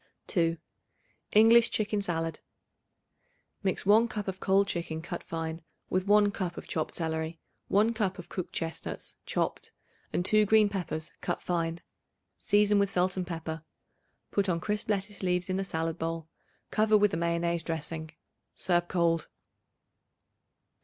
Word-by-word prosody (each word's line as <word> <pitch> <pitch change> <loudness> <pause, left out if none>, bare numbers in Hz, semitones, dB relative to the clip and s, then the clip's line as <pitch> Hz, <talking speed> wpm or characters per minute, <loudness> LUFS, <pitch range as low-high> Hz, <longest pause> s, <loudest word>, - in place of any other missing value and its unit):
2. 165 -3 +2 0.8
English 225 +2 +7
Chicken 210 -1 0
Salad. 165 -4 -2 1.2
Mix 190 -2 -1
1 220 +4 +6
cup 210 -3 -4
of 190 0 -3
cold 195 +1 +3
chicken 170 -3 -3
cut 170 +1 -5
fine 165 0 -4 0.3
with 185 +1 0
1 205 0 +5
cup 180 -3 -3
of - - -7
chopped 155 - -2
celery, 160 0 -2 0.3
1 215 +4 +3
cup 205 -4 -1
of 180 - -9
cooked 185 - -5
chestnuts 165 -1 -4
chopped - - -2 0.4
and 175 - 0
2 215 0 +4
green 215 0 +5
peppers 175 -5 -4
cut - - -1
fine. 170 -1 -2 0.6
Season 205 -1 +4
with 200 -1 +2
salt 185 0 +1
and 185 -2 -3
pepper. 165 -2 -5 0.7
Put 200 -1 +1
on 170 -2 +1
crisp 210 +3 -2
lettuce 205 0 -2
leaves 180 0 0
in 185 - 0
the 195 - 0
salad 165 -2 -2
bowl; 165 0 -3 0.4
cover 215 0 +4
with 210 -2 +3
a - - +1
mayonnaise 170 0 0
dressing. 160 -1 -4 0.5
Serve 175 -1 +1
cold. 170 -2 +1
180 Hz, 145 wpm, -29 LUFS, 165-205 Hz, 1.2 s, English